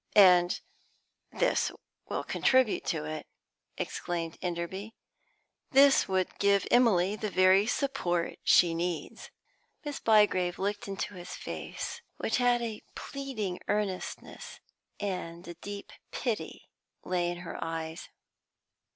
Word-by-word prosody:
"And 180 -3 +7 0.7
this - - +1 0.4
will - - -2
contribute 260 -4 +2
to 155 -2 -1
it," 155 0 -5 0.5
exclaimed 165 -1 -3
Enderby. 185 +5 -4 0.7
"This 275 0 +6
would 190 -1 -1
give 200 -1 +3
Emily 210 -6 +4
the 215 0 -3
very 185 +2 +5
support 175 - -1
she 170 -2 +5
needs." 170 -1 -3 0.6
Miss 290 -1 -4
Bygrave 205 -5 +3
looked 205 +2 -2
into 195 +1 -4
his 180 -1 -8
face, - - -6 0.2
which - - 0
had 245 -1 +3
a 220 -2 -4
pleading 240 -10 -4
earnestness, 205 -3 -3 0.4
and 180 -4 -4
a 175 - -6
deep 200 +4 -8 0.2
pity 235 -4 -3 0.4
lay 175 -1 0
in 175 - -4
her - - -5
eyes. 165 0 -5
190 Hz, 115 wpm, -30 LUFS, 175-215 Hz, 0.7 s, And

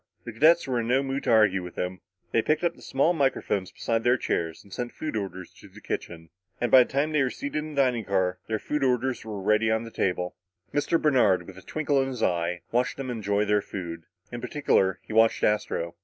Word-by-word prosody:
The 120 - -7
cadets 160 +8 +5
were 125 -3 -1
in 115 - -2
no 130 +3 +2
mood 135 +1 -3
to - - 0
argue 105 -4 +4
with 90 -1 -9
him. 90 0 -4 0.3
They 115 - +3
picked 155 +7 0
up 170 -1 +2
the - - -19
small 140 +6 +1
microphones 135 - 0
beside 115 0 -1
their 125 +1 +4
chairs 80 -8 -2
and 100 - -15
sent 120 -1 -4
food 155 -6 -5
orders 95 -3 -5
to - - -13
the - - -15
kitchen; 80 -1 -6 0.3
and 120 -2 -1
by 130 - +9
the - - -13
time 140 +3 +1
they 150 -2 +2
were 130 - +2
seated 285 - -5
in 155 0 -6
the 140 - +4
dining 120 -4 0
car, 95 -2 0
their 110 -1 -1 0.2
orders 130 0 0
were 105 -2 -6
ready 105 +3 +2
on 110 +1 +1
the 115 - -9
table. 90 -3 -1 0.4
Mr. 145 +3 +1
Bernard, 105 - +3
with 95 +1 -11
a - - -14
twinkle 145 +3 0
in 135 - -1
his 125 -4 -4
eye, 85 0 0
watched 125 +2 0
them 135 -2 -4
enjoy 105 -2 0
their 105 0 +2
food. 85 -5 -7 0.3
In 120 0 -6
particular, 115 -8 +1
he - - -8
watched 115 0 +4
Astro. 90 -5 0
115 Hz, 230 wpm, -26 LUFS, 95-135 Hz, 0.4 s, by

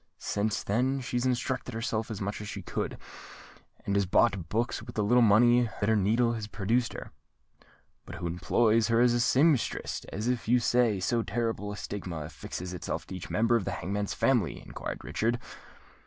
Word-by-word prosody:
Since 105 0 -1
then 130 +6 +1
she's 125 0 -1
instructed 125 -1 -2
herself 115 -1 -2
as 110 -3 -5
much 100 +1 -3
as 105 - -6
she - - -6
could, - - -3 0.9
and 100 - 0
has 100 -1 +2
bought 95 -3 +2
books 115 +1 -1
with 120 +2 -10
the 105 - +1
little 120 +4 +4
money 120 +2 +5
that 100 - +1
her 110 - +4
needle 115 +4 +2
has 110 -2 -4
produced 115 +4 0
her." - - -8 1.0
"But - - -7
who 85 - -6
employs 110 +6 +2
her 115 0 +3
as 120 0 +5
a 120 - +1
sempstress, 135 +2 +2
if, 105 +4 -3
as 125 -3 -1
you 125 +2 +5
say, 120 -3 +2
so 115 +5 +1
terrible 115 -3 -2
a 105 - -6
stigma 90 -7 -5
affixes 90 +4 -6
itself 90 - -4
to 95 - -7
each 90 - -7
member 115 +2 +2
of 110 -5 0
the - - -2
hangman's 100 +2 -3
family?" 115 - +1
inquired - - -7
Richard. 120 +2 0
110 Hz, 185 wpm, -29 LUFS, 100-120 Hz, 1.0 s, money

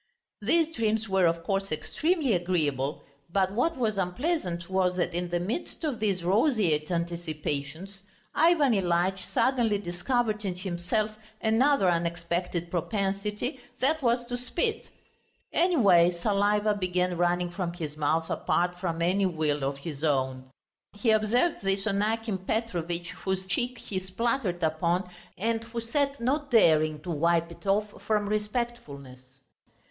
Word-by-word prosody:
These 325 +9 +2
dreams 220 -2 0
were, 190 -3 +3
of 165 0 -1
course, 195 +1 -1
extremely 290 - 0
agreeable, 155 -6 0 0.3
but 190 0 +2
what 285 +10 0
was 215 -5 0
unpleasant 180 - -1
was 185 -1 +1
that 180 -1 -1
in 175 0 -2
the 175 0 0
midst 220 - -4
of 290 -7 -1
these 195 -5 0
roseate 190 - +2
anticipations, 170 0 -3 0.3
Ivan 310 -5 +4
Ilyitch 185 0 +1
suddenly 235 -4 +1
discovered 215 +4 -1
in 190 -3 -2
himself 185 +4 -1 0.3
another 230 0 +3
unexpected 170 0 -1
propensity, 205 - -2 0.2
that 305 +5 +2
was 240 -1 +1
to 245 0 -3
spit. 355 - -2 0.6
Anyway 205 - +5
saliva 205 +4 +1
began 180 -2 0
running 175 0 +1
from 175 -1 -3
his 155 -4 -5
mouth 155 +2 0
apart 175 0 0
from 170 -2 -2
any 190 +3 +2
will 155 -4 -1
of 135 +1 -1
his 145 0 -7
own. 130 -3 0 0.4
He 220 +2 +1
observed 220 +9 +2
this 195 0 0
on 200 -2 +1
Akim 220 -2 -1
Petrovitch, 175 -4 -2
whose 190 -1 -1
cheek 245 +6 -1
he 195 -4 -4
spluttered 190 -1 -1
upon 170 +3 +1 0.3
and 225 +3 0
who 235 0 -5
sat 275 +4 -1
not 280 +5 0
daring 155 - +4
to 180 - -4
wipe 170 +2 +1
it 170 - -12
off 205 +1 0
from 210 -2 0
respectfulness. 150 - -4
190 Hz, 140 wpm, -28 LUFS, 170-225 Hz, 0.6 s, Anyway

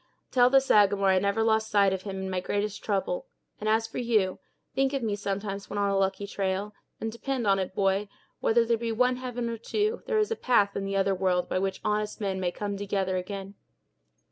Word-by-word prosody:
Tell 250 -2 +5
the 270 +1 +6
Sagamore 205 -6 +4
I 190 -1 +4
never 200 +3 +1
lost 220 0 +2
sight 200 -2 +4
of 190 - -3
him 195 -1 -5
in - - -3
my 185 - 0
greatest 205 +2 -2
trouble; - - -1 0.3
and, 215 - -1
as 220 +1 +3
for 225 - -6
you, 215 -6 +1 0.3
think 270 +1 +1
of 270 -3 -1
me 210 -2 0
sometimes 200 0 -4
when 205 - -4
on 200 -1 +1
a - - +1
lucky 195 +1 0
trail, 200 +1 -2 0.3
and 225 - -3
depend 250 +1 -3
on 195 -1 +3
it, 185 0 -3
boy, 195 +1 +1 0.3
whether 230 +1 +3
there 230 0 +2
be 230 0 -2
one 250 +2 +2
heaven 245 -2 -4
or 230 0 -3
two, 425 - -1
there 460 - +1
is 430 +1 +1
a - - +1
path 205 - +2
in 195 - -2
the 195 0 -2
other 195 0 +2
world 185 -1 +1
by - - 0
which 195 0 -2
honest 210 0 -1
men 195 -3 -2
may 180 -1 0
come 200 +1 -4
together 195 -2 -1
again. 195 +1 -5
205 Hz, 225 wpm, -28 LUFS, 195-230 Hz, 0.3 s, the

